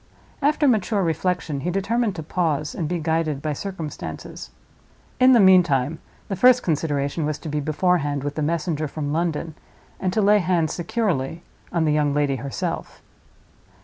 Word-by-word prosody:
After 295 +1 +2
mature 215 -4 +2
reflection, 165 -3 -1
he 170 - -2
determined 205 +3 0
to 160 - -5
pause, 155 -3 -1
and 155 -3 -3
be 180 - -1
guided 160 -2 -1
by 150 +1 -2
circumstances. 170 -1 -7 0.7
In 260 0 +7
the 240 - +6
meantime, 165 -7 +4 0.3
the 195 - -2
first 250 +5 +5
consideration 150 -1 -1
was 150 0 -1
to 155 - -8
be 150 0 -1
beforehand 150 -2 0
with 145 0 -3
the 155 - -3
messenger 155 0 -1
from 145 0 -4
London, 165 -1 -1 0.5
and 185 - -1
to 215 - 0
lay 205 +1 +5
hands 175 -4 +1
securely 170 - -2 0.3
on 170 -2 +1
the 150 - +2
young 145 -1 +1
lady 145 -2 +1
herself. 135 +2 -5
165 Hz, 160 wpm, -23 LUFS, 150-185 Hz, 0.7 s, In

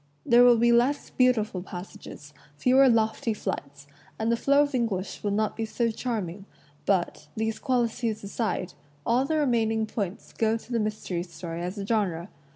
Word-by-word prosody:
There 240 +1 +6
will 245 -1 +7
be 235 +1 +4
less 245 +5 +2
"beautiful" 220 -7 +2
passages, 175 -5 -10 0.2
fewer 260 - +5
lofty 220 -1 +1
flights, 140 -7 -5 0.3
and 220 +1 0
the - - +4
flow 280 +4 +4
of 285 -1 -3
English 225 -7 -2
will 205 - -1
be 200 - 0
not 215 0 -1
so 230 +1 0
charming; 205 -6 -4 0.4
but, 175 -5 0
these 220 0 -1
qualities 235 -3 -1
aside, 200 -3 -2 0.3
all 245 +3 +2
the 315 +2 0
remaining 225 -6 +1
points 205 -3 -5
go 225 0 +1
to 235 - -14
the 235 - +1
mystery 210 -5 -2
story 170 -1 -7
as 180 +4 -4
a 200 - -4
genre. 195 -5 -1
220 Hz, 165 wpm, -27 LUFS, 190-240 Hz, 0.4 s, will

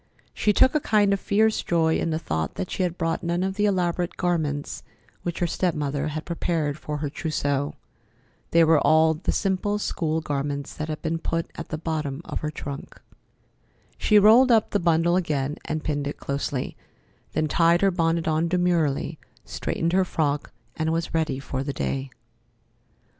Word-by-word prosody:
She 210 - +2
took 260 +5 +5
a 305 - +3
kind 210 -6 +3
of 200 - 0
fierce 215 +3 +2
joy 160 -2 +2
in - - -1
the 155 - 0
thought 80 - -3
that 90 - -4
she - - -2
had 180 -1 -1
brought 165 -1 -1
none 170 +1 -1
of 190 0 -1
the 205 +1 +1
elaborate 180 -2 0
garments 155 -5 -1 0.4
which 170 -1 -4
her 175 - +1
step 175 0 0
mother 145 0 -1
had 155 +1 -4
prepared 165 -4 -1
for 150 -1 -4
her 150 0 -2
trousseau. 145 -2 -1 0.7
They 165 0 +5
were 160 -1 +5
all 160 +1 +4
the 160 +4 -2
simple 200 +1 0
school 160 -6 -1
garments 145 -2 -3
that 155 - -4
had 155 -1 -5
been 165 0 -1
put 165 0 -2
at 165 - -7
the 155 - -3
bottom 155 -3 -3
of - - -4
her 150 - -3
trunk. 140 -2 -7 1.0
She 210 - +4
rolled 225 +5 +7
up 225 -2 +3
the 205 - +2
bundle 170 0 +3
again 150 -5 -1
and 155 0 -3
pinned 145 -2 -1
it 145 - -4
closely, 140 -1 -3 0.6
then 155 +1 +1
tied 170 +3 +3
her 195 -1 +4
bonnet 165 -1 0
on 160 +1 +2
demurely, 170 -5 +1 0.3
straightened 165 +1 -2
her 190 0 +4
frock, 150 -5 -1 0.2
and 160 0 0
was 165 0 -2
ready 160 -5 0
for 135 -1 -4
the 140 0 -3
day. 135 0 -2
160 Hz, 180 wpm, -25 LUFS, 150-175 Hz, 1.0 s, rolled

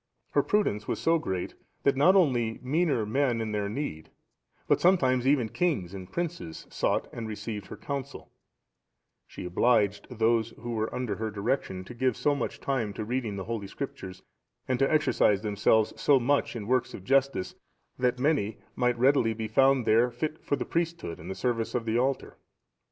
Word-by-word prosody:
Her - - +4
prudence 110 - 0
was - - -1
so 165 0 +3
great, 95 -9 -3 0.3
that 140 - +3
not 175 +8 +5
only 120 -11 +2
meaner 145 -4 +1
men 120 +1 +1
in 110 -1 -2
their 105 -1 -1
need, 105 - -5 0.6
but - - +3
sometimes 130 -9 +3
even 135 -5 +3
kings 110 - -1
and 95 -1 -8
princes, 170 - -4
sought - - 0
and 115 -2 -5
received 105 -1 -5
her - - -9
counsel; 140 -2 -6 1.0
she - - -8
obliged 105 +2 +2
those 115 -1 +1
who 120 +2 -5
were 110 -1 -1
under 120 -6 -3
her 110 0 -2
direction 100 -3 -2
to 110 - -10
give 125 0 0
so 145 - +2
much 140 -4 -3
time 120 -7 -1
to 110 - -5
reading 120 -2 -2
of - - -5
the 95 - -4
Holy 110 -2 -4
Scriptures, 95 -6 -7 0.4
and 130 -1 0
to 135 - +2
exercise 105 -9 +3
themselves 105 +1 +2
so 140 -2 +5
much 140 +2 +1
in 110 -3 -5
works 125 +2 0
of 95 - -10
justice, 135 -5 +1 0.5
that 125 0 +2
many 130 -6 +1 0.2
might 125 -1 +1
readily 120 -3 +3
be 110 0 -3
found 135 +2 +3
there 115 +3 +4
fit 155 +6 -4
for - - 0
the - - -4
priesthood 165 - -2
and 85 - -9
the 95 - -4
service 115 +3 -1
of 120 -2 -1
the 115 +1 +1
altar. 130 +1 -1
120 Hz, 185 wpm, -28 LUFS, 105-135 Hz, 1.0 s, not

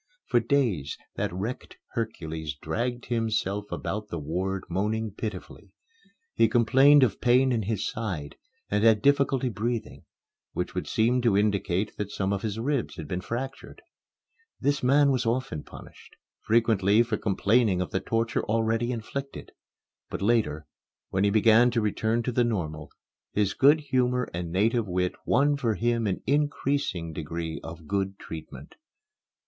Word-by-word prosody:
For 120 - +3
days, 115 - 0 0.2
that - - -2
wrecked 100 +8 -5
Hercules 80 - -4
dragged 120 - -3
himself 105 -3 -1
about 105 +1 -4
the 85 - -5
ward 90 +5 -2
moaning 105 +4 -1
pitifully. 105 +2 -7 0.6
He 115 - +3
complained 135 +5 +6
of 110 -6 0
pain 125 +2 +4
in 115 -2 +1
his 105 0 -2
side 90 -10 -4 0.4
and 105 +1 +1
had 110 -2 +5
difficulty 140 -2 +3
in 125 - -1
breathing, 115 +2 -3 0.5
which - - -3
would - - -3
seem 120 +3 +2
to 115 -5 +3
indicate 100 -1 0
that 105 -1 -3
some 100 -1 -1
of 100 - -2
his 110 -1 -3
ribs 135 +2 -1
had 80 - -7
been 90 +4 -3
fractured. 130 +7 -6 0.8
This 145 0 +1
man 140 +2 +4
was 125 -3 0
often 115 - -1
punished, - - -14 0.3
frequently 110 -1 +4
for 115 -2 -2
complaining 105 0 +2
of 90 - -3
the 95 - 0
torture 115 +2 -1
already 115 +2 0
inflicted. 135 +4 -6 0.6
But - - -4
later, 100 -10 +1 0.5
when 95 +1 +1
he - - +4
began 110 +3 +5
to 120 -1 0
return 110 +2 0
to 125 - -1
the 120 0 +2
normal, 80 -10 -3 0.4
his 100 -2 +1
good 145 +3 +5
humor 125 -3 +1
and 85 0 -4
native 110 +4 +1
wit 90 0 0
won 145 +2 +3
for 115 -5 0
him 115 +1 0
an 95 - -2
increasing 140 - 0
degree 80 +1 -4
of 80 0 -9
good 95 +1 -2
treatment. 80 -4 -9
110 Hz, 155 wpm, -27 LUFS, 95-120 Hz, 0.8 s, complained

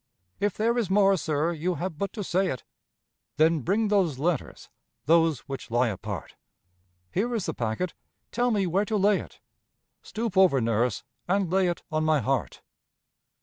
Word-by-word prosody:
"If 205 -1 0
there 235 +3 +2
is 215 -6 -1
more, 195 0 +4
sir, 155 -1 0
you 170 +3 -2
have 170 -2 -4
but 200 - -2
to 210 - -4
say 190 +1 +1
it." 130 -8 -4 0.7
"Then 160 +1 +4
bring 205 - 0
those 185 -9 +2
letters 160 +1 -2 0.4
those 160 -1 +3
which 135 -4 -7
lie 120 +1 +2
apart." 95 - -6 0.8
"Here 235 +5 0
is 210 -6 -2
the 160 - -2
packet! 120 +10 -2 0.4
Tell 245 +1 +1
me 205 -4 +1
where 190 +4 +1
to 215 0 -1
lay 200 0 +3
it." - - -11 0.6
"Stoop 225 -3 -4
over, 185 -8 +5
nurse, 115 -1 0 0.2
and 190 -1 +1
lay 190 0 +3
it 175 - -3
on 155 0 0
my 155 -1 +3
heart." 130 -2 -2
175 Hz, 170 wpm, -27 LUFS, 150-200 Hz, 0.8 s, over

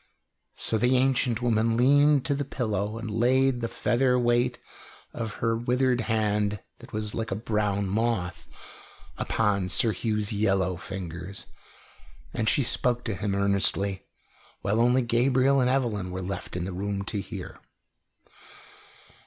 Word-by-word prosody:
So 110 - +1
the 125 +3 +3
ancient 125 -2 +1
woman 115 -1 +2
leaned 145 +2 +4
to 145 - +1
the 140 0 -1
pillow 110 -5 -2
and 115 -1 -5
laid 125 +3 +2
the 115 - -1
feather 125 +2 +1
weight 120 0 +1 0.6
of 115 -2 -4
her 115 0 0
withered 125 +1 +1
hand, 105 -2 0 0.2
that - - -14
was 105 0 -3
like 115 0 -3
a 95 - -2
brown 105 -2 -1
moth, 100 -3 -1 0.7
upon 100 -4 0
Sir 110 +6 +3
Hugh's 105 -2 -1
yellow 95 -3 +1
fingers, 90 +1 -7 0.9
and 110 0 +1
she 140 - +2
spoke 120 0 +1
to 110 - -2
him 100 +1 -2
earnestly, 100 -1 0 0.6
while 105 +3 +1
only 125 +2 +3
Gabriel 130 +3 +3
and 125 - +2
Evelyn 115 -8 0
were 95 +1 -5
left 95 0 -5
in 90 -1 -2
the 95 - -5
room 100 +1 -3
to 105 -1 -3
hear. - - -8
110 Hz, 145 wpm, -26 LUFS, 100-125 Hz, 0.9 s, leaned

